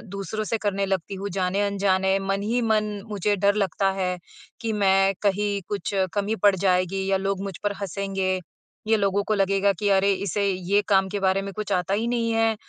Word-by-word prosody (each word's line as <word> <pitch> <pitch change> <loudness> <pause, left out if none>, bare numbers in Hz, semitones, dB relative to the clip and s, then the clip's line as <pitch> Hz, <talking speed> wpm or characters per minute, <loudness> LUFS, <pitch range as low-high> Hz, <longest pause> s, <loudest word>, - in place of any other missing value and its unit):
दूसरों 215 +2 -3
से 225 +1 -1
करने 200 -2 -1
लगती 190 0 -2
हूँ 200 +1 -4
जाने-अनजाने, 195 0 +1
मन 195 0 -1
ही 230 +4 0
मन 220 -2 +2 0.2
मुझे 205 0 0
डर 200 +1 +2
लगता 195 -1 +1
है, 180 -1 -1 0.4
कि 225 -1 -1
मैं 195 -1 +3
कहीं 205 0 0
कुछ 205 0 -3 0.2
कमी 205 +2 0
पड़ 200 -2 +6
जाएगी 190 0 +1
या 195 - +4
लोग 195 0 -2
मुझ 195 -3 -5
पर 205 0 0
हँसेंगे। 195 -1 -2 0.5
ये 220 - +4
लोगों 200 0 +1
को 215 - -1
लगेगा 195 0 +2
कि, 205 +3 -1
"अरे, 195 0 +4
इसे 200 +1 -2
ये 190 +3 +1
काम 195 -2 +3
के 205 - -3
बारे 190 0 +2
में 195 0 -6
कुछ 210 0 -5
आता 180 +1 0
ही 225 +3 0
नहीं 230 -1 0
है।" 225 -1 +2
200 Hz, 200 wpm, -24 LUFS, 190-205 Hz, 0.5 s, पड़